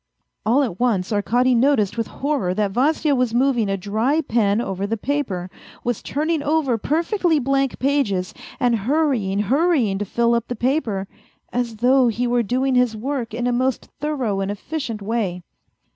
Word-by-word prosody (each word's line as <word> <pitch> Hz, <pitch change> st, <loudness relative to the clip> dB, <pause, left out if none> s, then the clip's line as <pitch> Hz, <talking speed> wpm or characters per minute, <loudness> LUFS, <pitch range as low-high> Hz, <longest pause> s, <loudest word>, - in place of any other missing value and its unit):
All 260 Hz, +6 st, +4 dB
at 205 Hz, -9 st, -4 dB
once 220 Hz, -5 st, +1 dB
Arkady 245 Hz, +5 st, +2 dB
noticed 235 Hz, -5 st, +2 dB
with 230 Hz, -2 st, -2 dB
horror 270 Hz, -11 st, -1 dB
that 205 Hz, -1 st, 0 dB
Vasya 290 Hz, +6 st, +2 dB
was 250 Hz, -3 st, 0 dB
moving 245 Hz, -4 st, +2 dB
a 195 Hz, -, 0 dB
dry 220 Hz, -, 0 dB
pen 215 Hz, -6 st, +1 dB
over 195 Hz, -4 st, -2 dB
the 225 Hz, +2 st, -1 dB
paper, 220 Hz, -8 st, -2 dB, 0.4 s
was 240 Hz, -2 st, -2 dB
turning 310 Hz, +2 st, -1 dB
over 290 Hz, -4 st, +1 dB
per 310 Hz, +9 st, 0 dB
fectly 350 Hz, -5 st, +1 dB
blank 275 Hz, 0 st, 0 dB
pages, 245 Hz, -10 st, 0 dB, 0.3 s
and 245 Hz, -3 st, +3 dB
hurrying, 240 Hz, -4 st, 0 dB
hurrying 260 Hz, -, +2 dB
to 205 Hz, -, -2 dB
fill 235 Hz, +4 st, +1 dB
up 235 Hz, -1 st, 0 dB
the 245 Hz, -, -3 dB
paper 240 Hz, -8 st, -1 dB, 0.5 s
as 240 Hz, -2 st, -1 dB
though 250 Hz, +3 st, +4 dB
he 235 Hz, +2 st, 0 dB
were 240 Hz, 0 st, +2 dB
doing 255 Hz, +4 st, 0 dB
his 250 Hz, -3 st, +2 dB
work 250 Hz, 0 st, -3 dB
in 240 Hz, +1 st, -2 dB
a 245 Hz, -, +2 dB
most 255 Hz, +1 st, -1 dB
thorough 265 Hz, -9 st, -1 dB
and 195 Hz, 0 st, -2 dB
efficient 225 Hz, +1 st, -4 dB
way. 195 Hz, -5 st, -2 dB
245 Hz, 175 wpm, -21 LUFS, 210-275 Hz, 0.5 s, All